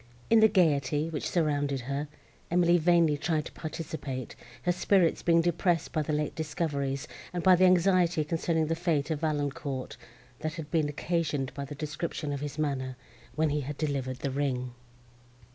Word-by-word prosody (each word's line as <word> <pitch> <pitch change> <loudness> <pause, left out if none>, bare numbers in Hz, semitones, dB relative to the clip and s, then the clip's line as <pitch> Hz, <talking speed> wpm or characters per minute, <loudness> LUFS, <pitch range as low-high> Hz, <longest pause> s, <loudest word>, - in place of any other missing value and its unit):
In 225 - +7
the 220 - +8
gaiety, 150 -5 +2
which 150 - -3
surrounded 145 -5 0
her, 140 +4 -3 0.4
Emily 175 0 +4
vainly 165 -2 +4
tried 155 -2 0
to - - -8
participate, 150 -5 -5 0.3
her 180 - +2
spirits 180 -1 +2
being 170 -1 +4
depressed 175 -1 +1
by 155 - 0
the 150 - -2
late 150 0 -1
discoveries, 150 -3 -2 0.2
and 175 -2 -3
by 185 -1 +7
the 185 +1 +5
anxiety 180 -2 +4
concerning 160 +1 0
the 160 - 0
fate 165 -3 0
of 155 - -1
Valancourt, 145 -3 -2 0.4
that 155 0 -3
had 160 -3 -7
been 155 -3 +2
occasioned 150 -3 -1
by 140 0 -5
the 145 +1 -8
description 150 0 -4
of 140 - -3
his 145 0 -5
manner, 130 -4 -2 0.4
when 155 -1 +2
he 150 0 0
had 145 +1 -5
delivered 135 -4 -2
the 140 +1 -3
ring. 130 -3 -2
155 Hz, 170 wpm, -29 LUFS, 140-170 Hz, 0.4 s, the